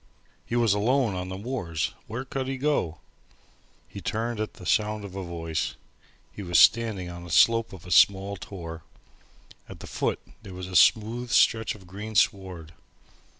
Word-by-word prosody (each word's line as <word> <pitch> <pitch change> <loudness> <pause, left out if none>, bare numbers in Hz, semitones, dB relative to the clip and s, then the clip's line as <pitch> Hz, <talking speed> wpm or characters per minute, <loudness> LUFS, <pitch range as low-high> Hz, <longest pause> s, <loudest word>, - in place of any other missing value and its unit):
He 120 - -2
was 115 -4 +3
alone 115 +2 +1
on 90 0 -4
the 95 - -5
moors! 100 - -3
Where 120 +4 -5
could 130 0 -4
he 135 0 -3
go? 110 - -1 0.9
He - - -9
turned 115 +1 -2
at 110 - -3
the - - -12
sound 105 -1 0
of 95 -1 -9
a 95 - -4
voice. 80 -2 -3 0.6
He - - -9
was 90 -3 +1
standing 110 -1 +4
on 85 0 -8
the 85 - -10
slope 115 +4 +4
of 95 -4 -11
a 90 - -9
small 100 +3 +4
tor. 85 -3 -8 0.9
At - - -10
the - - -9
foot - - -2 0.2
there 95 -2 -10
was 90 0 -6
a 95 - -7
smooth 115 +7 +4
stretch 110 -1 +3
of 95 -3 -15
green 105 +4 -8
sward. 95 -6 0
100 Hz, 175 wpm, -26 LUFS, 90-115 Hz, 0.9 s, standing